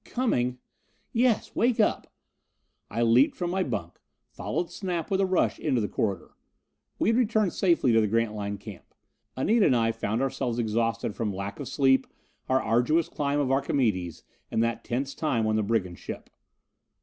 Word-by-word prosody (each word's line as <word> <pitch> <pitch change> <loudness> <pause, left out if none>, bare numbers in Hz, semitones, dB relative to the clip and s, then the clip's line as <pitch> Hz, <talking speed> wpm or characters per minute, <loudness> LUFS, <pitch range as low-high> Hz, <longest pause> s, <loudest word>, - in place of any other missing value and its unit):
"Coming 125 - 0 0.3
" - - -42
"Yes. 225 -4 -1
Wake 240 0 +2
up!" 210 - +1 0.8
I 115 - -1
leaped 120 +5 +4
from 175 -1 -2
my 190 +1 0
bunk, 85 - -4 0.3
followed 175 - -3
Snap 180 -1 -3
with 195 0 +2
a 195 - +2
rush 185 -1 +1
into 135 -5 +1
the 105 - 0
corridor. 100 -5 -2 0.7
We - - +1
had 230 - +3
returned 220 -5 +2
safely 170 -10 +2
to 115 - +5
the 105 - +2
Grantline 105 -2 -1
Camp. 100 -1 -12 0.4
Anita 215 - +3
and 130 - +3
I 115 -1 +2
found 115 +2 -2
ourselves 125 -3 -2
exhausted 115 -1 -1
from 110 -3 -2
lack 100 +4 -5
of 140 - -5
sleep, 135 -1 +3 0.4
our 130 0 +4
arduous 130 +9 +2
climb 145 0 -1
of 135 -2 +1
Archimedes 110 - 0 0.3
and 115 - +1
that 115 0 -2
tense 135 +3 -2
time 125 -8 0
on 110 0 +1
the 110 - +2
brigand 100 -5 -1
ship. - - -8
125 Hz, 175 wpm, -27 LUFS, 110-165 Hz, 0.8 s, to